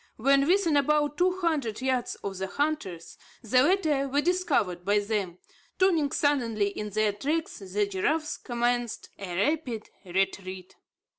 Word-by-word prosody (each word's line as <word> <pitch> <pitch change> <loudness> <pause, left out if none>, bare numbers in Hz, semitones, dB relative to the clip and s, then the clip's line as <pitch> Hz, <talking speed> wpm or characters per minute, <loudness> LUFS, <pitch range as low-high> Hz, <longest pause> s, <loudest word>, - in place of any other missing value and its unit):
When 275 +4 +3
within 345 -4 +3
about 295 +1 +2
two 365 +1 +2
hundred 285 -11 0
yards 255 -1 -1
of 195 -1 -4
the 190 - -2
hunters, 285 - -3 0.2
the 250 +3 +4
latter 300 -4 +2
were 280 +2 +1
discovered 295 - 0
by 205 +3 +2
them. 200 -4 -1 0.4
Turning 335 -7 +3
suddenly 230 -8 +1
in 210 +1 -5
their 210 0 +1
tracks, 305 +10 -2
the 200 +1 -1
giraffes 305 +11 -1
commenced 240 -1 -2
a 185 -3 -5
rapid 245 - -1
retreat. 185 0 -3
245 Hz, 140 wpm, -27 LUFS, 200-300 Hz, 0.4 s, the